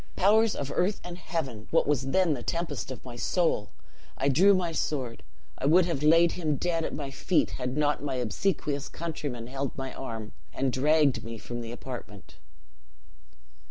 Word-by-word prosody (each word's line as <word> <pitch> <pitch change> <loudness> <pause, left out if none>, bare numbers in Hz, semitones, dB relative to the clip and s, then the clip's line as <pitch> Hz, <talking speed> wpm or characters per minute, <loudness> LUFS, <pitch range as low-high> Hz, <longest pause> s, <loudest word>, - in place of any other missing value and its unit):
Powers 215 +3 +4
of 140 -1 -3
earth 190 +4 +1
and 175 -1 -6
heaven, 135 -11 -4
what 165 - +3
was 135 -2 +1
then 175 +3 +3
the 125 - -4
tempest 165 -2 -3
of 130 -2 -8
my 125 -2 -7
soul! 160 - +1 0.5
I 140 - +2
drew 190 +9 +6
my 175 -2 0
sword 135 -7 -2 0.4
I 135 - 0
would 170 +4 +6
have 165 -6 -2
laid 165 +3 +6
him 155 -4 -1
dead 165 +2 0
at - - -3
my 140 -2 -4
feet, 165 +5 +1
had 125 +2 -2
not 150 -1 +2
my 140 -2 -2
obsequious 140 - -1
countrymen 145 -8 -4
held 135 +1 -4
my 135 -1 -4
arm, 115 -5 -6 0.2
and 130 -1 0
dragged 150 0 +3
me 115 0 -6
from 120 +2 -6
the 115 0 -6
apartment. 120 -6 -9
145 Hz, 175 wpm, -28 LUFS, 125-170 Hz, 0.5 s, drew